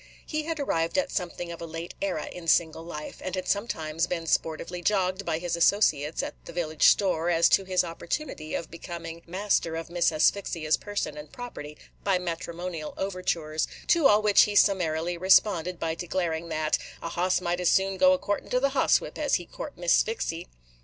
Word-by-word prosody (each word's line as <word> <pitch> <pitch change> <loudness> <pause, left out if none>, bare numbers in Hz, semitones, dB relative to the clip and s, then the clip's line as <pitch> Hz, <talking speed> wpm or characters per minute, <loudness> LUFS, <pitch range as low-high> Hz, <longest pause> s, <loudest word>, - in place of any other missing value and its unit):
He 310 -1 -3
had 325 -1 -3
arrived 165 -10 0
at 280 - +1
something 175 -1 -3
of 170 - -8
a 165 - -5
late 165 +1 -6
era 185 -6 -1
in 175 -2 -9
single 160 0 +3
life, 150 -3 -8
and 185 - -3
had 185 - -4
sometimes 165 -6 -1
been 165 -2 -3
sportively 165 +2 -1
jogged 190 0 0
by 160 -2 +1
his 170 0 -2
associates, 165 -4 +2
at - - -4
the - - -8
village 160 -3 +2
store, 175 -4 +3
as 170 -1 +5
to 195 - +3
his 185 -1 +2
opportunity 165 - -4
of 165 - -5
becoming 170 -1 -7
master 185 -2 0
of 165 +1 -6
Miss 175 -1 +2
Asphyxia's 155 -1 +2
person 205 -7 -4
and 150 0 -9
property 150 -12 -8 0.3
by 195 -2 +2
matrimonial 170 -1 -5
overtures; 170 -5 -2 0.2
to 330 -5 +6
all 210 -2 +4
which 210 -1 +6
he 210 - -4
summarily 175 -4 +2
responded 180 -2 +3
by 165 -1 -1
declaring 170 -1 -2
that 155 -1 0 0.2
"a 170 - -3
hoss 180 +2 +1
might 175 0 -1
as 180 -1 +2
soon 195 0 +2
go 275 +6 +6
a - - +2
courtin' 205 -6 -3
to 250 - +2
the 275 +2 +2
hoss 270 -1 +3
whip - - -8
as 290 -2 +2
he 175 - -2
court - - -8
Miss 175 -1 +2
Sphyxy." 175 -6 0
175 Hz, 195 wpm, -27 LUFS, 165-195 Hz, 0.3 s, to